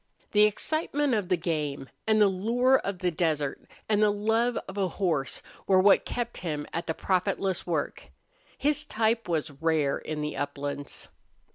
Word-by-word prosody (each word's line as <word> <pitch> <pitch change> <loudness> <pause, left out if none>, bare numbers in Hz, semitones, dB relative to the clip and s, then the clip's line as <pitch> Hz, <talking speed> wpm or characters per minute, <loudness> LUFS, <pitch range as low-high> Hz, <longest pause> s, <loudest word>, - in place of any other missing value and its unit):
The 210 0 +6
excitement 290 +5 0
of 205 -5 0
the 180 - +3
game, 150 -5 -2 0.2
and 215 0 +4
the 210 - +7
lure 235 +7 +3
of 200 -1 -4
the 180 -1 0
desert, 155 -4 -1 0.3
and 210 -1 +2
the 210 - +5
love 225 +4 +1
of 190 - -8
a 195 -2 +1
horse 165 -6 -1 0.2
were 190 -1 +5
what 195 +1 +5
kept 240 -1 -3
him 150 -4 -3
at 165 - -3
the 160 - -1
profitless 190 0 0
work. 160 -4 -2 0.5
His 295 +1 +1
type 225 -6 0
was 155 -2 -1
rare 155 -4 +1
in 155 -1 -4
the 150 0 -3
uplands. 145 0 -5
185 Hz, 165 wpm, -28 LUFS, 155-220 Hz, 0.5 s, the